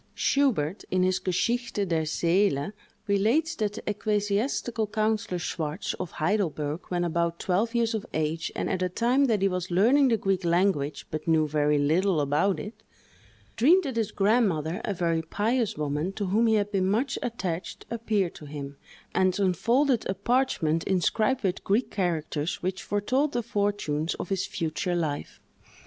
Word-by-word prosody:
Schubert, 215 - +1
in 185 0 +2
his 185 0 +2
"Geschichte 205 +4 -1
der 160 -2 0
Seele," 170 0 +1 0.3
relates 225 +11 +2
that 210 -2 -1
the - - -9
ecclesiastical 210 +2 0
councillor 215 -3 0
Schwartz, 160 -3 -3
of 170 - -5
Heidelberg, 155 -3 -1
when 175 -1 0
about 170 0 0
twelve 210 +8 0
years 230 -1 +2
of 220 -2 -2
age, 160 +1 -2
and - - -2
at 185 -1 -1
a 185 - +1
time 245 +8 +2
that 215 -6 +1
he - - +5
was 180 -1 -2
learning 240 +11 +4
the 230 -3 +3
Greek 195 -2 0
language, 170 -5 +1
but 155 +1 -5
knew 160 -1 +3
very 150 0 +2
little 160 +5 +2
about 150 +7 +1
it, 210 +3 -8 0.7
dreamed 340 +11 +5
that 270 -6 -4
his 225 -3 0
grandmother, 195 -5 +1
a 205 - -2
very 170 -2 0
pious 220 +6 -1
woman, 150 +4 -1
to 205 0 -3
whom 215 +5 +2
he 220 - +4
had 205 -1 0
been 190 -2 +1
much 240 +6 0
attached, 190 -8 -4
appeared 215 -6 0
to 150 - -11
him, 140 -1 -7 0.4
and 185 +1 +2
unfolded 230 - +2
a 190 - 0
parchment 195 -8 +1
inscribed 215 +7 +1
with 190 -1 -1
Greek 215 +6 +1
characters 165 -5 -2
which 185 +1 -2
foretold 255 +8 0
the 240 -1 -1
fortunes 205 -8 -1
of - - -6
his 195 -1 -1
future 170 +2 -2
life. 155 -4 -3
195 Hz, 165 wpm, -27 LUFS, 165-220 Hz, 0.7 s, he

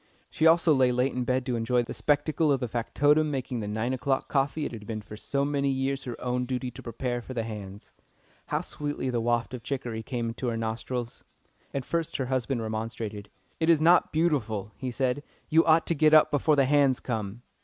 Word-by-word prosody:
She 160 - +3
also 165 -1 +5
lay 130 -2 +4
late 125 +2 +1
in 125 -1 -2
bed 125 +1 0
to 125 - -1
enjoy 120 +2 +1
the - - -6
spectacle 150 +1 +1
of 135 - +2
the 125 - -2
factotum 145 +6 +2
making 130 -3 -3
the 105 - -4
nine 110 +4 -1
o'clock 135 +1 -1
coffee 145 +2 0
it - - -4
had 105 -3 -9
been 110 -2 -4
for 105 - -10
so 140 +6 -1
many 140 -1 0
years 135 0 -1
her 120 -2 -6
own 125 0 -1
duty 125 -1 -3
to 115 - -11
prepare 120 +1 -3
for 130 +2 -9
the 115 - -1
"hands." 105 -2 -8 0.6
How - - 0
sweetly 145 -3 -4
the 120 -1 0
waft 120 +1 0
of 125 - -5
chicory 120 -3 -4
came 115 -1 -3
to 125 +1 -4
her 115 -1 -1
nostrils! 115 +2 -4 0.5
At 135 -2 -3
first 165 -2 -2
her 135 - -1
husband 130 -1 -1
remonstrated. 110 -2 -4 0.3
"It 160 0 +1
is 165 -2 +6
not 170 +3 +5
beautiful," 115 - 0
he 130 - -4
said. 130 +2 -1 0.3
"You 160 +1 +5
ought 160 0 +5
to - - +1
get 155 0 +5
up 155 - +6
before 150 +1 +3
the 140 -2 +4
'hands' 140 -2 +3
come." 110 -1 -4
125 Hz, 215 wpm, -27 LUFS, 115-145 Hz, 0.6 s, is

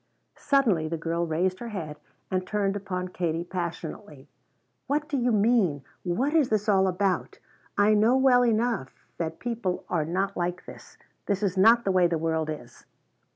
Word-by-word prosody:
Suddenly 235 - +2
the 165 +1 -3
girl 170 +1 -2
raised 180 +4 0
her 240 - -6
head 165 -9 -6 0.3
and 185 -1 -1
turned 205 -2 0
upon 185 -2 -4
Katie 170 -2 -2
passionately. 175 -1 -6 0.6
"What 295 +2 0
do 305 - -3
you 250 -2 +1
mean? 205 - +2 0.2
What 245 - -1
is 310 -6 +3
this 215 -1 0
all 190 -2 +4
about? 185 0 -1 0.4
I 205 +1 +5
know 220 +5 +4
well 260 -2 +5
enough 230 - 0 0.2
that 160 -1 -3
people 230 -7 -3
are 170 -4 +1
not 190 +4 -1
like 175 0 -3
this! - - -13 0.3
This 200 0 0
is 195 -2 0
not 225 +5 +5
the 195 - +2
way 185 -2 +4
the 170 -1 -1
world 160 -1 -1
is!" 120 -6 -8
190 Hz, 170 wpm, -26 LUFS, 170-225 Hz, 0.6 s, I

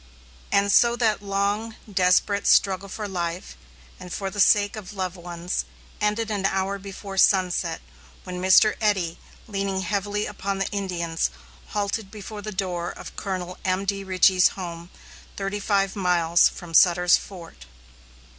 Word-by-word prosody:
And 200 0 +3
so 235 +3 +5
that 225 -4 +1
long, 205 +3 -1
desperate 195 +1 +2
struggle 195 0 +3
for 210 +2 -5
life, 175 - -4 0.4
and 180 - -10
for 195 +1 -3
the 205 - -7
sake 205 +1 +4
of 205 -2 -8
loved 185 -2 -3
ones, 175 - -4 0.4
ended 210 +1 0
an 195 -2 +1
hour 195 +1 -1
before 195 0 -6
sunset, 180 -4 +2 0.4
when 180 -1 -6
Mr. 190 +3 +5
Eddy, 190 -6 0 0.3
leaning 195 -2 -2
heavily 205 +2 -1
upon 200 -1 -4
the 195 - -1
Indians, 175 -5 -2 0.4
halted 205 0 -2
before 210 0 -8
the 215 +1 -6
door 180 -3 -3
of - - -10
Colonel 185 -2 -5
M.D. 195 +1 -1
Richey's 185 -1 +4
home, 170 -2 -7 0.5
thirty 195 +1 -3
five 195 -1 0
miles 175 -3 +3
from 170 -2 -11
Sutter's 180 +1 +6
Fort. 170 - -11
195 Hz, 140 wpm, -24 LUFS, 180-205 Hz, 0.5 s, Sutter's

